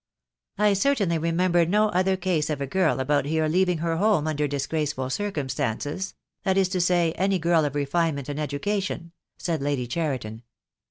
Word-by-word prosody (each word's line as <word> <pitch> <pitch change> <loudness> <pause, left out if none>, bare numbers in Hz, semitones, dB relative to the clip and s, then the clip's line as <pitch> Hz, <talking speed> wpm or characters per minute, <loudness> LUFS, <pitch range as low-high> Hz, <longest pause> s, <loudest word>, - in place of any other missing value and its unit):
"I 210 0 +4
certainly 200 -6 +1
remember 170 +2 +2
no 210 +5 +2
other 190 0 +1
case 175 -5 0
of 150 -2 -2
a 140 - -1
girl 185 0 +1
about 145 +2 +1
here 160 +1 +1
leaving 180 +2 +2
her 165 0 -1
home 200 -5 +2
under 150 -1 0
disgraceful 145 -1 -2
circumstances 145 - -2
— - - -58
that 190 -1 +1
is 190 -1 +3
to 185 -1 0
say, 175 -2 +2
any 190 +3 +1
girl 165 -2 +2
of 145 -1 -3
refinement 145 -1 0
and 145 0 -4
education," 170 +4 -2 0.3
said 165 -5 -2
Lady 140 -3 -1
Cheriton. 125 -6 -3
165 Hz, 170 wpm, -25 LUFS, 145-185 Hz, 0.3 s, I